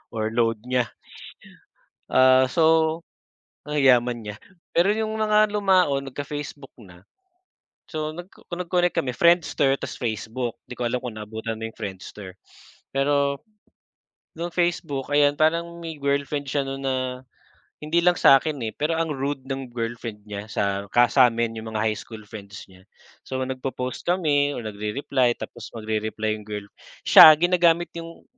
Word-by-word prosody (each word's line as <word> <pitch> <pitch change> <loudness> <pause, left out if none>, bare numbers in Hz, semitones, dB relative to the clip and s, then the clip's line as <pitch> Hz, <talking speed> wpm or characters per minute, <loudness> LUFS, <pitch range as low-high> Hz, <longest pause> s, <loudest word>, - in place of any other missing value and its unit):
or 110 -1 -1
load 115 -2 0
niya. 125 -2 +2 1.3
Ah, 130 0 +6
so 160 +1 +3 0.7
ang 150 - -3
yaman 125 -4 +3
niya. 105 - -5 0.4
Pero 175 +3 +4
yung 220 0 -2
mga 215 0 +4
lumaon, 180 -10 +2
nagka-Facebook 145 0 -7
na. 90 -1 -16 0.9
So 155 -1 -4
nagko 175 +2 -12
nag-connect 180 0 0
kami, 130 - 0
Friendster, 155 -3 +3
ta's - - -7
Facebook. 115 +1 -3
'Di - - -11
ko 120 - 0
alam 125 +1 -2
kung 115 -3 -6
naabutan 110 +1 -5
mo 115 - -3
yung - - -15
Friendster, 95 -2 -8 0.6
pero, 140 0 +1 1.0
nong 170 +1 -5
Facebook, 160 -6 -1
ayan, 145 0 +4
parang 170 +2 0
may 160 -3 -7
girlfriend 140 0 -1
siya 140 0 0
no'n 135 0 -5
na 130 - +1 0.9
hindi 165 +3 +2
lang 180 0 +4
sa 135 - +7
akin, 155 -1 -4
eh, 110 - -4
pero 160 +2 -1
ang 165 -2 -1
rude 135 0 -3
ng 135 -1 -5
girlfriend 115 -2 -5
niya, 105 0 -6
sa 100 -1 -1
ka 120 - +5
sa 130 -3 +6
amin, 115 0 -2
yung 110 0 -7
mga 105 - 0
high 110 -1 +1
school 110 -2 -10
friends 100 -2 -10
niya. 95 0 -18 0.5
So 130 0 -3
nagpo-post 130 -1 -5
kami 145 -5 +1
o - - -5
nagre-reply 115 +4 -1
tapos 120 -2 -8
magre-reply 110 0 -2
yung 105 - -14
girl. 105 -1 -5 0.4
Siya, 155 - +11
ginagamit 175 0 +3
'yong 165 0 -9
135 Hz, 150 wpm, -24 LUFS, 115-160 Hz, 1.3 s, Siya